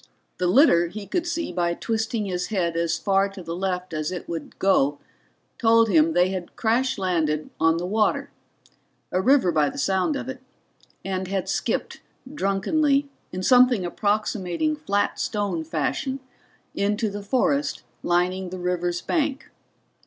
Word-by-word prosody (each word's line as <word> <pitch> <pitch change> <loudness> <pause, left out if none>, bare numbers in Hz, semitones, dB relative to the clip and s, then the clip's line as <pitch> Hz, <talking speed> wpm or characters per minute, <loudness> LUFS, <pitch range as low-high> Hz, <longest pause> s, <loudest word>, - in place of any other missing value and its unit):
The 180 - +1
litter 175 - +5
he 205 +4 -7
could 340 - -2
see 335 - -2
by 170 -1 0
twisting 220 0 -2
his 180 -2 -2
head 175 -6 -1
as 170 0 0
far 195 0 +2
to 195 -2 -10
the 165 0 -5
left 180 -1 -3
as 155 +1 -2
it 180 - -6
would 165 -3 -6
go 145 -7 +2 0.6
told 230 -1 +4
him 160 -3 +4
they 180 +2 +3
had 185 -2 -5
crash 245 +3 +1
landed 160 -5 -1
on 165 0 +3
the 175 - -3
water 210 +3 0 0.8
a 185 - +1
river 255 -4 +4
by 150 -3 +2
the - - -9
sound 190 - +1
of 275 - -4
it 260 0 -6 0.7
and 190 -1 -2
had 190 -1 -2
skipped - - -2 0.3
drunkenly, 280 +6 +1 0.2
in 185 +1 -4
something 245 -4 +5
approximating 205 - -1
flat 205 -8 -1
stone 200 -6 -1
fashion, 165 - -2 0.5
into 210 +3 0
the 205 +1 -5
forest 275 +7 0 0.2
lining 180 +2 0
the 185 - -6
river's 175 -1 -1
bank. 295 -3 -1
190 Hz, 155 wpm, -24 LUFS, 175-225 Hz, 0.8 s, litter